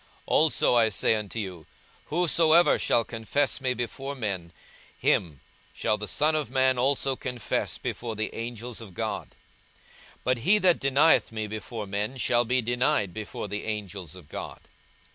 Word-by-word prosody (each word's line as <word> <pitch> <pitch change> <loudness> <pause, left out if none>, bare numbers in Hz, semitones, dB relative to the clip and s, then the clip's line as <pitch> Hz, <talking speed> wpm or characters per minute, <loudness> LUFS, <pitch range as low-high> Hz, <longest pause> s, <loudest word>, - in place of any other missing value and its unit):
42:012:008 - - -30 0.2
Also 155 -5 +3
I 115 -2 +5
say 105 - +2
unto 105 0 -4
you, 90 -7 -5 0.4
Whosoever 165 0 +4
shall 115 - +2
confess 120 +6 -1
me 130 -1 0
before 135 +4 -4
men, 100 -9 -4 0.5
him 75 -6 +1 0.3
shall 105 - +1
the 105 - -4
Son 150 +10 +2
of 150 -5 -1
man 130 -1 +2
also 135 +1 +2
confess 125 -2 -2
before 115 -2 -4
the 110 +1 -3
angels 115 0 -6
of 100 -6 -11
God: - - -3 0.9
42:012:009 - - -32
But 125 0 +1
he 190 - +4
that 185 -4 +4
denieth 135 +2 +4
me 110 -1 -3
before 110 +1 -5
men 105 +6 -3
shall 120 0 +2
be 125 +2 +1
denied 120 - +1
before 105 0 -5
the 105 +1 -4
angels 100 -6 -5
of 90 -5 -13
God. - - -7
120 Hz, 160 wpm, -27 LUFS, 105-135 Hz, 0.9 s, I